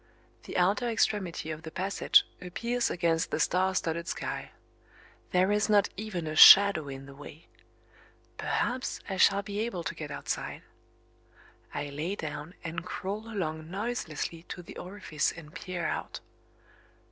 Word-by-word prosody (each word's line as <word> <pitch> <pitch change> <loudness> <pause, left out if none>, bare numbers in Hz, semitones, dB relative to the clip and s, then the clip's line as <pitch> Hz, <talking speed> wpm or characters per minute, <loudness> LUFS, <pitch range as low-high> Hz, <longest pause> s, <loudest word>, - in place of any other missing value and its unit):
The - - -4
outer 200 +7 +2
extremity 195 -8 0
of 155 0 -6
the 160 - -7
passage 190 +4 +3 0.2
appears 235 +7 -1
against 165 -2 +1
the - - -2
star 185 +1 +2
studded 170 -1 -1
sky. - - -4 0.8
There 185 +2 +3
is 210 +1 +2
not 205 -2 +4
even 190 -5 -4
a 155 0 -4
shadow 195 -4 +9
in 135 0 -7
the 135 - -11
way. 145 +3 -12 0.9
Perhaps 255 +2 -2
I 190 - -3
shall 200 +1 +4
be 200 0 -4
able 215 -6 -2
to - - -3
get 155 -2 -7
outside. 140 - -4 1.1
I 145 0 -4
lay 160 +7 -3
down, 155 +1 -6
and 165 0 -4
crawl 205 +5 -5
along 160 -6 -3
noiselessly 185 -6 -3
to 180 - -6
the - - -11
orifice 180 -5 -2
and 155 -2 -12
peer 180 -2 -5
out. - - -3
180 Hz, 145 wpm, -29 LUFS, 160-200 Hz, 1.1 s, shadow